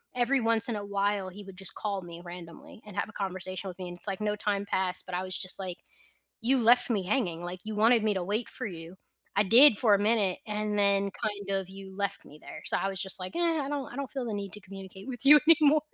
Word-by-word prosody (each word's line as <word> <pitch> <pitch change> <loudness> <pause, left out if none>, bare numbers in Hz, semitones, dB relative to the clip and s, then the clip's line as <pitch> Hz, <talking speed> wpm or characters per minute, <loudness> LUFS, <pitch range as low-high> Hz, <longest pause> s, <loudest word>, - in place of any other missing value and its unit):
every 250 +2 +1
once 225 0 +6
in 230 - -1
a 205 -1 -5
while, 200 -1 -1
he 205 +3 -11
would 190 -1 -13
just 190 -2 +4
call 200 -3 -3
me 170 0 -10
randomly 175 +4 -11
and 210 - -11
have - - -2
a - - -14
conversation 185 -1 -4
with 180 - -11
me, 180 - -6
and 175 - -9
it's 190 - +2
like, 195 0 -3
no 210 0 -1
time 205 -1 -2
passed, 190 -2 +1
but 180 -1 -6
I 185 - -2
was 185 0 -3
just 185 - +4
like, 185 -2 -5 0.6
"You 255 +4 +2
left 245 +2 +4
me 200 -5 0
hanging, 180 -8 -1
like, 180 +1 -7
you 215 0 -5
wanted 225 +1 +4
me 210 -2 +2
to 185 - -2
wait 215 +5 -2
for - - -5
you, 170 -1 -9 0.4
I 205 - +4
did 235 +2 +7
for 215 -4 +4
a - - +3
minute 205 -3 +1
and 210 0 -2
then 200 0 +2
kind 205 -2 -5
of 190 -1 -4
you 195 0 -11
left 200 -1 -1
me 150 - -14
there." - - -11
So - - 0
I 195 - -1
was 195 -1 -4
just 190 0 +1
like, 185 - -7
"Eh, - - -1
I 325 -5 0
don't 285 -2 -4
I - - -10
don't 280 -2 -5
feel 260 -3 -4
the 215 - -3
need 200 -2 -5
to 210 - -8
communicate 195 +3 -11
with 245 0 -4
you 300 0 +9
anymore." 305 -2 +6
200 Hz, 265 wpm, -28 LUFS, 185-225 Hz, 0.6 s, you